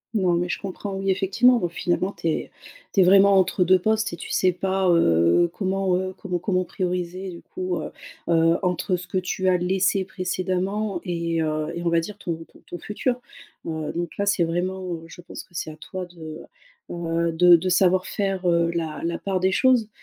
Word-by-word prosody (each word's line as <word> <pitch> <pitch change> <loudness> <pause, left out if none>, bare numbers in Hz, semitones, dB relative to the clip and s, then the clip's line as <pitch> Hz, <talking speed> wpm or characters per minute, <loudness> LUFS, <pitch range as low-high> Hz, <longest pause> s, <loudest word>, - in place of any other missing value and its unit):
Non, 185 -4 +2
mais 175 +1 0
je - - -2
comprends. 195 +1 -6
Oui, 195 0 0
effectivement, 235 +7 +3
donc 175 - -1
finalement, 180 +3 -1
tu 165 - -4
es 160 - -2 0.4
tu 195 - +4
es - - +7
vraiment 195 +1 +6
entre 185 0 +3
2 185 +1 +5
postes 220 +3 0
et - - -5
tu - - -8
sais 185 -1 +3
pas, 190 +1 -1
heu, 85 - +4
comment, 190 -2 0
heu, 185 0 -3
comment 180 -3 -3
comment 185 0 0
prioriser, 180 +1 -3
du 170 -1 -10
coup, 370 0 -4
heu - - -5 0.4
heu, 165 0 +4
entre 180 +1 0
ce 180 +1 -6
que 185 +2 -1
tu 185 +1 -2
as 180 - +4
laissé 190 +2 +1
précédemment 185 +2 -2
et 170 -2 -1
heu, 155 0 -1
et 170 - -4
on 170 - +1
va 170 0 +3
dire 195 +5 -6
ton 165 -1 -5
ton - - -19
ton 175 - -8
futur. 245 +6 -2 0.5
Heu, 160 -2 -3
donc 170 -1 -4
là, 200 - 0
c'est 200 -4 +2
vraiment, 185 +3 -2
heu, 160 - -10
je 165 +1 -12
pense - - -9
que - - -27
c'est 160 - -4
à 155 - -9
toi 185 +3 -6
de, 160 -3 -9 0.5
heu, 170 -1 -1
de 175 +1 +7
de 175 +3 0
savoir 185 0 +3
faire, 195 -2 -2
heu, 170 0 +2
la 160 -2 -3
la 170 0 -2
part 190 -2 -1
des 190 +1 +2
choses. 250 0 +3
180 Hz, 215 wpm, -24 LUFS, 170-190 Hz, 0.5 s, es